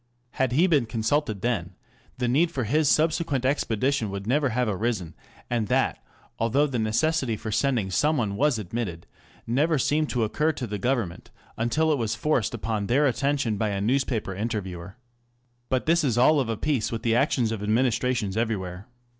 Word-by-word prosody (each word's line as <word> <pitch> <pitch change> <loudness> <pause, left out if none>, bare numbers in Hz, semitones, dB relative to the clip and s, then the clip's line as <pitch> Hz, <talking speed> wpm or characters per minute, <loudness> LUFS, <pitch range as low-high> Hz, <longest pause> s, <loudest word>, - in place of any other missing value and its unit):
Had 130 -2 0
he 160 +7 +4
been 150 -10 +2
consulted 115 -1 -1
then, 95 -7 -2 0.4
the 125 -1 -1
need 150 +8 +3
for 135 -6 -3
his 145 +6 +2
subsequent 155 -4 +1
expedition 130 -3 0
would 100 0 -5
never 140 +4 +2
have 125 +1 0
arisen, 105 -5 -2 0.3
and 115 -3 -1
that, - - 0 0.4
although 120 +6 +2
the 130 -5 -2
necessity 120 +2 +1
for 110 +1 -5
sending 110 -3 0
some 150 +8 +2
one 105 -4 -1
was 145 +1 +2
admitted, 100 -4 -4 0.4
never 150 +7 +2
seemed 150 +3 +1
to 120 -3 0
occur 150 +9 +1
to 135 -4 -4
the 105 -2 -4
Government 115 -6 -2 0.3
until 150 +8 +1
it 145 - -1
was 115 -1 -1
forced 120 -3 0
upon 110 -2 -2
their 140 +5 +3
attention 135 -4 0
by 110 +1 0
a 100 -1 -2
newspaper 115 -2 0
interviewer. 100 -2 -5 0.7
But 130 -1 0
this 170 +1 +3
is 125 -5 +1
all 145 +5 +5
of 130 -4 -1
a 115 - -1
piece 135 -5 -1
with 115 0 -4
the 115 -2 +2
actions 120 -3 +2
of 110 -3 -3
administrations 115 -1 0
everywhere. 100 -4 -3
120 Hz, 180 wpm, -25 LUFS, 110-140 Hz, 0.7 s, all